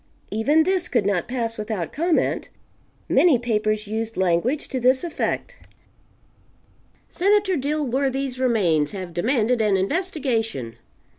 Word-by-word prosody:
Even 285 +10 +3
this 365 0 0
could 235 -6 0
not 195 -4 0
pass 230 -3 -3
without 210 -7 -4
comment. 335 +1 0 0.6
Many 335 -8 +4
papers 215 -2 -1
used 220 +2 -4
language 190 - +1
to 260 - -2
this 255 +3 +3
effect: 350 +8 -3 1.5
"Senator 400 0 +2
Dilworthy's 275 -2 -1
remains 185 - +2
have 185 -3 -6
demanded 230 +5 +1
an 210 -3 +2
investigation. 225 - -1
240 Hz, 115 wpm, -23 LUFS, 210-290 Hz, 1.5 s, Many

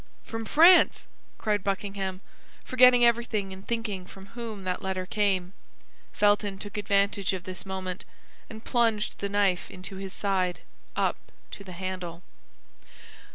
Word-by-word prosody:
"From 225 0 -5
France!" 340 +8 +6 0.3
cried 210 -2 0
Buckingham, 195 -1 -3 0.4
forgetting 250 -1 +6
everything 230 -4 +1
in 190 0 -8
thinking 210 -4 -3
from 195 +1 -12
whom 225 -4 -6
that 185 -1 -2
letter 190 -1 -2
came. 195 -2 0 0.6
Felton 205 -1 +2
took 205 +1 -8
advantage 200 -1 +1
of 185 -2 -4
this 185 +2 -8
moment, 185 -1 -4 0.5
and 220 0 -10
plunged 225 -4 +1
the 200 - -2
knife 200 -3 +1
into 185 +1 -9
his 195 0 -6
side 185 -3 -1 0.3
up - - +1 0.3
to 200 - -9
the 185 -2 -9
handle. 180 -1 -5
200 Hz, 135 wpm, -27 LUFS, 185-215 Hz, 0.6 s, France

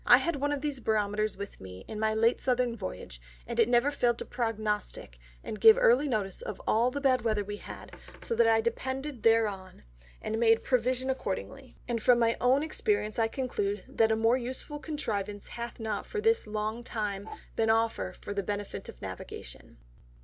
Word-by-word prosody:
I - - +9
had 340 -4 -1
one 285 +1 0
of 290 -2 -1
these 290 -3 -2
Barometers 215 -1 0
with 200 0 -8
me 95 0 -10
in 215 - -6
my 220 0 +1
late 230 +2 +3
Southern 250 -2 +1
Voyage, 185 - -7 0.2
and - - -4
it - - +5
never 245 +4 +4
failed 240 -4 +1
to - - -6
prognostick 215 - -3 0.2
and 215 - -6
give 445 +1 +9
early 485 -10 +4
notice 205 -7 -2
of 210 - -6
all 235 +3 +3
the 285 +3 -4
bad 265 -2 +3
Weather 215 -2 0
we 205 +1 -6
had, - - -10 0.2
so - - -2
that 230 0 +4
I 225 0 +4
depended 260 +3 -3
thereon, 205 - +1 0.4
and 220 - -3
made 225 -1 +4
provision 255 +1 +1
accordingly; 265 +2 -5
and 235 -2 -1
from 245 +2 +5
my 230 -1 +3
own 260 +4 +4
Experience 315 - 0
I 225 - +3
conclude 210 -6 -2
that 220 -1 +2
a - - +4
more 225 +3 +3
useful 260 +4 -5
Contrivance 210 -10 -4
hath 235 0 -6
not 220 -2 -3
for 430 - -3
this 450 - +2
long 215 +2 -3
time 210 -3 -3 0.3
been 225 -1 +1
offer 220 - +1
for 205 - -5
the 200 - -1
benefit 205 +1 -5
of - - -12
Navigation. - - -8
225 Hz, 190 wpm, -29 LUFS, 210-255 Hz, 0.4 s, I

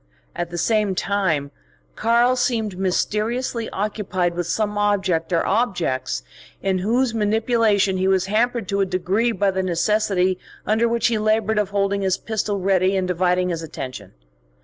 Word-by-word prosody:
At 175 -1 -3
the 175 - -6
same 210 +1 +1
time, 175 -8 0 0.4
"Karl" 235 +3 +3
seemed 230 -5 0
mysteriously 220 +5 -1
occupied 195 -3 -2
with 175 0 -3
some 210 +2 -1
object 195 -5 0
or 170 - +1
objects 185 - -1 0.4
in 190 -1 0
whose 235 +5 +1
manipulation 215 -2 +2
he 190 +1 +1
was 190 -1 +2
hampered 225 +1 0
to 200 0 +1
a - - +3
degree 190 +6 0
by 200 -2 +1
the 190 0 -1
necessity 185 0 +1 0.3
under 220 +2 +2
which 235 -1 0
he 230 -2 +2
laboured 215 0 +1
of 205 -2 0
holding 200 0 0
his 190 -1 +1
pistol 215 -2 -2
ready 190 0 +2
and 185 -1 0
dividing 180 0 +1
his 165 -2 -2
attention. 130 - -7
200 Hz, 155 wpm, -22 LUFS, 185-220 Hz, 0.4 s, Karl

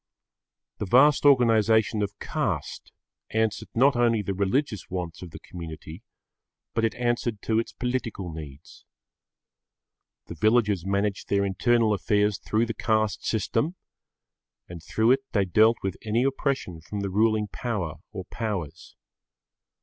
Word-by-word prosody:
The 105 - -3
vast 135 +8 +5
organisation 110 -4 +4
of 100 0 -3
caste - - -3 0.4
answered 110 -1 -1
not 135 +4 +4
only 115 -3 +2
the 100 - -2
religious 100 +3 -1
wants 90 -3 -5
of 90 - -8
the - - -10
community, 80 0 -9 0.7
but 115 - 0
it 115 - +1
answered 120 -2 -1
to 110 0 +1
its 115 - -3
political 115 -8 -3
needs. 75 -2 -11 1.4
The - - -8
villagers 105 -5 +2
managed 100 +1 -1
their 100 0 +2
internal 110 +3 +2
affairs 105 +1 +1
through 110 +2 0
the 115 - -4
caste 110 -3 0
system, 115 - -1 0.9
and 85 -2 -9
through 110 +8 +2
it 135 - +4
they 100 -3 +2
dealt 110 +5 +4
with 95 -1 -2
any 110 +3 0
oppression 135 - -1
from 100 +5 -5
the 100 -1 -3
ruling 110 +1 +2
power 95 -8 -4
or 95 -4 -6
powers. 100 -9 -5
110 Hz, 135 wpm, -26 LUFS, 95-115 Hz, 1.4 s, vast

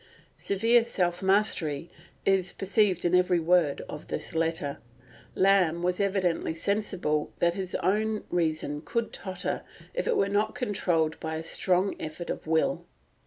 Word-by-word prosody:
Severe 230 +4 +3
self 180 -6 0
mastery 190 -6 +1 0.4
is 190 -2 +2
perceived 195 -2 +1
in 175 - +2
every 180 -1 +4
word 165 -3 +2
of 150 - -9
this - - -4
letter. 160 -3 -1 0.6
Lamb 185 -3 +3
was 180 +1 0
evidently 190 -5 0
sensible 180 -5 -1
that 170 0 +2
his 185 -1 -4
own 215 +3 +1
reason 155 -3 -1
would 235 -1 0
totter 185 -2 -4 0.3
if - - -2
it 480 - +2
were 195 - +3
not 205 +2 0
controlled 175 -8 0
by 160 0 -4
a 160 - -4
strong 185 +3 +1
effort 155 +2 -5
of - - -6
will. 160 0 +1
180 Hz, 145 wpm, -28 LUFS, 160-200 Hz, 0.6 s, every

